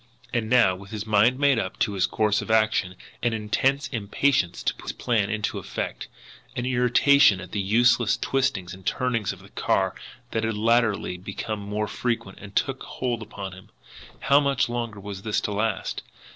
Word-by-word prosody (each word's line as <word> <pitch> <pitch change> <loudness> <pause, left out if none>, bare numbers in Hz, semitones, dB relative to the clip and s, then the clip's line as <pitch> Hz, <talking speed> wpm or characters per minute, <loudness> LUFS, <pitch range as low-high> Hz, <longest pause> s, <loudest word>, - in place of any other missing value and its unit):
And 115 -2 -1
now, 120 -7 +5
with 100 +2 -12
his 110 0 -5
mind 110 +4 +4
made 140 -3 +3
up - - -4
to 110 - +2
his 95 -2 +1
course 105 -1 +1
of - - -8
action, 110 -4 +2 0.3
an 120 -1 +1
intense 130 +6 0
impatience 115 -2 0
to - - +1
put - - -14
his - - -2
plan 110 -5 0
into 105 -1 -2
effect, - - -5 0.5
an 120 - -2
irritation 125 -2 +5
at - - -9
the 100 - -1
useless 115 +2 +3
twistings 130 -10 -1
and 95 0 -12
turnings 115 -1 0
of 95 0 -11
the 100 - -15
car - - 0 0.4
that 110 - -1
had 110 -1 -1
latterly 110 -5 +1
become 100 +3 -5
more 105 +1 -3
frequent, 105 -4 -4
took 135 -1 0
hold 120 -3 -3
upon 100 -3 -7
him. 95 0 -14 0.5
How 140 +1 +5
much 140 -3 +1
longer 115 -3 -3
was 100 -1 -7
this 105 0 0
to 105 - -3
last! 105 0 -1
110 Hz, 180 wpm, -25 LUFS, 100-120 Hz, 0.5 s, now